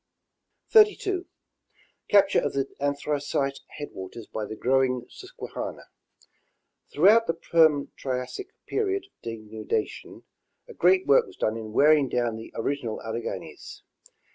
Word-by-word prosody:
32. 410 -4 +4 0.8
Capture 200 -1 +5
of - - -2
the 135 -1 0
Anthracite 140 -1 -1 0.2
headwaters 115 -6 -8
by 110 0 -5
the 110 - -7
growing 130 +1 +1
Sus - - -12
quehanna. - - -6 0.6
— - - -44
Throughout 210 +9 +5
the 165 - 0
Perm 160 -3 +3
Triassic 130 - -4 0.2
period 395 -2 -1
of 395 - -30
denudation, 110 -1 -4 0.4
a - - -11
great 185 +2 +3
work 140 - +5
was - - -15
done 110 - 0
in 110 -1 -6
wearing 145 +2 +4
down 120 -2 0
the 110 0 -9
original 120 -2 -2
Alleghanies. 115 +1 -6
140 Hz, 125 wpm, -26 LUFS, 115-175 Hz, 0.8 s, Capture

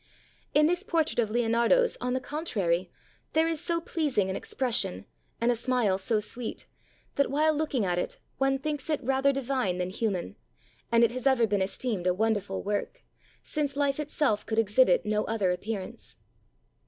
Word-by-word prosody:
In 300 +1 +6
this 355 +3 +1
portrait 330 - 0
of 225 -3 +2
Leonardo's, 235 - +3
on 250 0 -1
the 260 - +1
contrary, 195 - -1 0.4
there 320 +1 +3
is 325 -2 -1
so 340 -1 0
pleasing 290 - 0
an - - -3
expression, 225 - -1 0.3
and 235 +1 +3
a - - +1
smile 230 -5 +1
so 215 +3 +1
sweet, 225 +2 -4 0.5
that 280 - +3
while 305 +3 +3
looking 290 -7 0
at 175 -1 0
it - - -3 0.2
one 270 0 +2
thinks 295 +1 -4
it 305 - +1
rather 270 +2 +3
di 275 0 -2
vine 245 -8 -1
than 180 0 -2
human, 190 - -2 0.5
and 235 0 +5
it 230 - +4
has 255 +2 -2
ever 260 -4 +4
been 205 -2 0
esteemed 195 -1 -2
a 180 - +2
wonderful 205 -2 -1
work, 210 - -3 0.4
since 290 -3 -2
life 280 0 +1
itself 285 -7 0
could 220 - -3
exhibit 220 -2 +4
no 210 0 +1
other 210 -5 +1
appearance. 195 +1 -5
240 Hz, 175 wpm, -28 LUFS, 205-285 Hz, 0.5 s, In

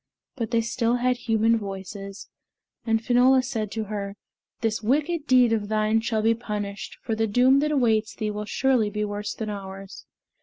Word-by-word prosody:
But 230 -4 -3
they 230 -1 +2
still 230 +1 0
had 250 +1 +1
human 225 -1 +2
voices, 195 0 -7 0.6
and 225 0 +1
Finola 255 +1 +5
said 225 -5 -3
to 220 - -2
her, 200 -1 -5 0.5
"This 220 -1 0
wicked 295 +7 0
deed 250 -3 +5
of 210 -2 -1
thine 215 +1 +1
shall 220 -1 -1
be 225 +1 +4
punished, 210 -3 -5
for 225 - -2
the 220 0 0
doom 250 +5 +4
that 300 +1 0
awaits 225 -6 +1
thee 215 -2 -2
will 210 0 -4
surely 250 -1 +1
be 210 +1 -2
worse 205 0 -4
than 215 -2 -4
ours." 195 -1 -8
225 Hz, 180 wpm, -25 LUFS, 210-245 Hz, 0.6 s, Finola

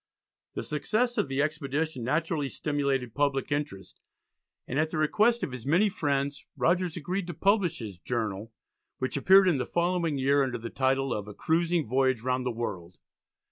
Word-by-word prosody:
The - - -3
success 220 - 0
of 185 - +1
the 135 +1 0
expedition 150 -2 -2
naturally 150 +2 0
stimulated 140 -6 -1
public 140 -1 0
interest, 145 -10 -4 0.7
and 135 - -1
at 155 0 +1
the 160 - -4
request 215 +10 +3
of - - -2
his 125 0 -7
many 180 +8 +4
friends, 140 -6 -1
Rogers 175 0 +1
agreed 180 +3 -3
to 175 - -5
publish 200 -1 +2
his 105 -6 -7
"journal," 110 -1 -3 0.5
which 130 - -2
appeared 190 +7 +6
in 160 -7 +3
the - - -1
following 170 -3 0
year 140 +2 +3
under 130 -2 -1
the 115 0 -7
title 135 0 +1
of 105 -1 -4
"A 105 - -9
Cruising 170 0 +1
Voyage 130 0 +1
round 130 0 0
the - - 0
World." 95 -7 -5
140 Hz, 175 wpm, -28 LUFS, 130-170 Hz, 0.7 s, appeared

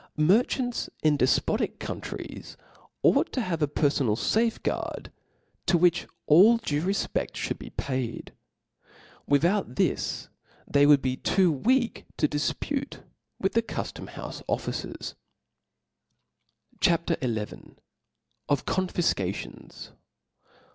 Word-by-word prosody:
Merchants 235 - +2
in 155 -1 +4
defpotic 130 -2 +1
countries - - -7 0.5
ought - - +4
to - - -1
have 170 -7 -2
a 150 - +3
perfonal 140 -6 +1
fafeguard, 225 - -1 0.6
to 175 - +4
which 175 0 +3 0.2
all 195 +10 +7
due 150 -10 -1
refpeft 195 +3 -1
(hould - - -3
be - - -8
paid. 130 -4 -4 0.9
Without 165 - +2
this - - 0 0.4
they 145 0 +4
would 145 -2 +6
be 130 -1 0
too 185 +3 +3
weak 240 - +1
to 150 - +3
difpute 270 - -3 0.4
with 195 - 0
the 230 - +4
cuilom 230 - -6
houfe - - -7
officers. - - -3 1.7
CHAP. 170 -2 +2
XL 110 -4 -1 1.0
Of 145 -2 +1
Confifcations. 170 - -2
165 Hz, 105 wpm, -27 LUFS, 140-205 Hz, 1.7 s, all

